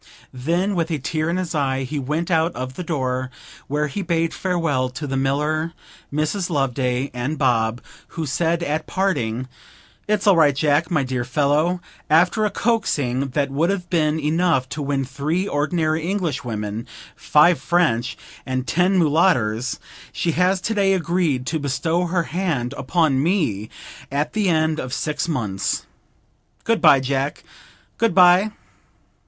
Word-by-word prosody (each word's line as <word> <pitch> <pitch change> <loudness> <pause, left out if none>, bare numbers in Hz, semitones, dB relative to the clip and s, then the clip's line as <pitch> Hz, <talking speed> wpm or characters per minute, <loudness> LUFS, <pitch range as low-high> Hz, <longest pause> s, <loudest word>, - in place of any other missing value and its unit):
Then 170 +10 0
with 170 -2 -1
a 160 - 0
tear 155 +3 -2
in 170 - 0
his 180 -2 -3
eye 135 -3 0
he 145 +3 -3
went 155 +6 -2
out 165 +1 +2
of 130 +1 -5
the 180 - -6
door, 130 -6 -2 0.4
where 150 +2 0
he 150 +8 -4
bade 165 -2 0
farewell 165 -9 0
to 145 +4 -6
the 135 -1 -3
miller, 150 +5 0 0.4
Mrs. 155 +6 -1
Loveday, 130 -3 0
and 125 +5 -3
Bob, 115 -2 +1 0.4
who 160 - -1
said 165 +4 0
at 155 0 -2
parting, 130 - -1 0.6
'It's 210 -1 0
all 200 -2 +6
right, 150 -4 +4
Jack, 150 +3 +2
my 155 -6 +1
dear 130 -1 -2
fellow. 150 +7 +1 0.3
After 175 +7 +4
a - - +2
coaxing 145 - 0
that 140 -1 0
would 155 +6 +1
have 185 -3 -3
been 155 -2 +2
enough 155 -3 +1
to 150 - -5
win 140 -1 -1
three 150 +8 -2
ordinary 155 +1 0
Englishwomen, 120 - -3 0.3
five 160 +1 +4
French, 130 -9 +1 0.3
and 130 -1 -2
ten 180 +6 +2
Mulotters, 145 - +2 0.3
she 170 - -1
has 180 +3 +2
to 225 - -1
day 195 -2 +3
agreed 170 -7 0
to 160 +3 -1
bestow 155 +5 0
her 170 0 0
hand 160 -9 -2
upon 135 0 +1
me 145 - 0 0.4
at 145 +2 -1
the 210 -3 +1
end 160 -1 +1
of 130 0 -5
six 150 +1 -2
months. 105 - -2 0.8
Good 230 -1 +1
bye, 150 -5 +6
Jack, 135 +2 -2 0.6
good 225 -5 +2
bye!' 180 +3 +6
155 Hz, 155 wpm, -21 LUFS, 135-175 Hz, 0.8 s, all